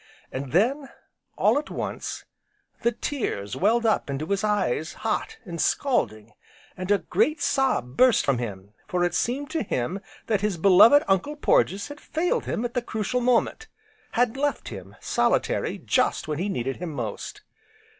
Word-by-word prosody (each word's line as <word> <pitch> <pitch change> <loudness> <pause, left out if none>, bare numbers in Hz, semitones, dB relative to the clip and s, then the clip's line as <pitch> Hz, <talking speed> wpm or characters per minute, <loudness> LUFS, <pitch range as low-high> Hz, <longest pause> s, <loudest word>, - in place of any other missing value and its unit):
And 130 0 -5
then, 260 - +2 0.5
all - - +4
at 300 - -8
once - - -5 0.6
the 235 - +2
tears 215 - -3
welled 230 +5 +2
up 220 -9 +1
into 140 +2 -2
his 200 +4 -1
eyes 190 -8 0
hot, 220 - -1
and 170 -4 -4
scalding, 110 - 0 0.4
and 185 +1 -6
a 205 - +5
great 305 +8 0
sob 260 - 0
burst 255 -2 +5
from 135 -4 +2
him, 100 -4 -6
for 180 -1 0
it 175 -1 +1
seemed 270 +8 -1
to 325 - -1
him 180 - -2 0.3
that 215 -3 0
his 210 -4 0
beloved 205 - +7
Uncle 195 +10 +1
Porges 200 -6 +2
had 290 +1 -10
failed 330 +3 -1
him 235 - -2
at 240 - -4
the 245 - 0
crucial 235 +2 -2
moment, 250 - +1 0.5
had 240 0 +2
left 290 +1 -1
him 95 -2 -9
solitary - - 0
just - - 0
when 150 -1 -2
he 195 +4 -1
needed 135 -6 -2
him 175 -2 -5
most. 120 -8 -5
200 Hz, 165 wpm, -25 LUFS, -, 0.6 s, beloved